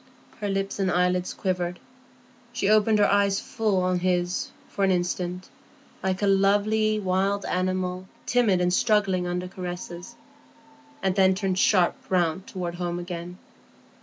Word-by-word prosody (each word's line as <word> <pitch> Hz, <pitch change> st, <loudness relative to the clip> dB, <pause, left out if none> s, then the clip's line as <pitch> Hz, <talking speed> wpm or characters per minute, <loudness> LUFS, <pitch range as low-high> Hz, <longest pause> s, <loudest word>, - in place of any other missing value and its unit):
Her 205 Hz, -2 st, -2 dB
lips 195 Hz, +1 st, -2 dB
and 190 Hz, -1 st, +1 dB
eyelids 180 Hz, 0 st, +1 dB
quivered; 180 Hz, -2 st, -2 dB, 0.7 s
she 220 Hz, -, -1 dB
opened 215 Hz, +1 st, +4 dB
her 205 Hz, -, +5 dB
eyes 200 Hz, -1 st, +2 dB
full 215 Hz, -6 st, 0 dB
on 180 Hz, 0 st, +1 dB
his 180 Hz, 0 st, 0 dB, 0.2 s
for 200 Hz, -, -3 dB
an 195 Hz, -, +4 dB
instant, 180 Hz, 0 st, -1 dB, 0.5 s
like 190 Hz, +1 st, -1 dB
a -, -, +4 dB
lovely 205 Hz, +2 st, +2 dB
wild 195 Hz, +1 st, 0 dB
animal 185 Hz, 0 st, -2 dB, 0.2 s
timid 220 Hz, -7 st, +2 dB
and 180 Hz, 0 st, +1 dB
struggling 195 Hz, -4 st, +2 dB
under 180 Hz, +1 st, -2 dB
caresses, 180 Hz, +2 st, -7 dB, 0.9 s
and 190 Hz, -1 st, +2 dB
then 190 Hz, 0 st, +4 dB
turned 190 Hz, -1 st, -1 dB
sharp 185 Hz, -4 st, +4 dB
round 180 Hz, 0 st, 0 dB
toward 175 Hz, -2 st, -4 dB
home 175 Hz, 0 st, -3 dB
again. 175 Hz, 0 st, -6 dB
185 Hz, 140 wpm, -25 LUFS, 180-200 Hz, 0.9 s, her